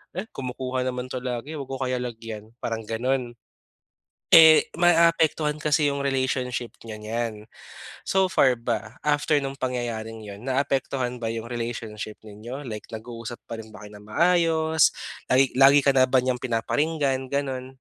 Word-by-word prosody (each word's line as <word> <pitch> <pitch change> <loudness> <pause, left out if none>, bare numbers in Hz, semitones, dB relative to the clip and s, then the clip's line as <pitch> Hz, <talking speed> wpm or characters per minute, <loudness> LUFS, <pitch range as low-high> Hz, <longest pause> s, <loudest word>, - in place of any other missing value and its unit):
"Eh, 195 +4 -4
kumukuha 130 0 -3
naman 125 0 -3
'to 130 - -3
lagi 125 +5 -4
wag 135 - -6
ko 135 - -4
kaya 130 -1 -1
lagyan." 115 -3 -7
Parang 115 -1 -3
ganon. 120 +2 -2 1.0
Eh, 160 -1 +9
maapektuhan 165 -3 +3
kasi 150 -1 +2
yung 140 - -3
relationship 130 -3 -1
niyo 110 -2 -8
niyan. 110 0 -4 0.6
So 190 0 +2
far 130 -9 +3
ba, 115 0 -4
after 150 0 +2
nung 135 -1 -2
pangyayari 120 -4 -3
yun, 105 -2 -10
naapektuhan 130 -1 -1
ba 115 - -1
yung 115 0 -4
relationship 115 -3 -5
ninyo 120 +7 -8
like 105 -3 -7
nag-uusap 115 +1 -7
pa 115 -1 -6
rin 110 - -14
ba 110 -1 -12
kayo 105 - -12
nang 105 +1 -14
maayos, 160 0 +3 0.4
lagi 130 0 +4
lagi 135 +2 +7
ka 140 - +5
na 130 -1 +4
ba 130 - +4
niyang 125 -1 0
pinaparinggan, 135 +2 0
ganon? 135 -2 -2
125 Hz, 155 wpm, -25 LUFS, 115-140 Hz, 1.0 s, Eh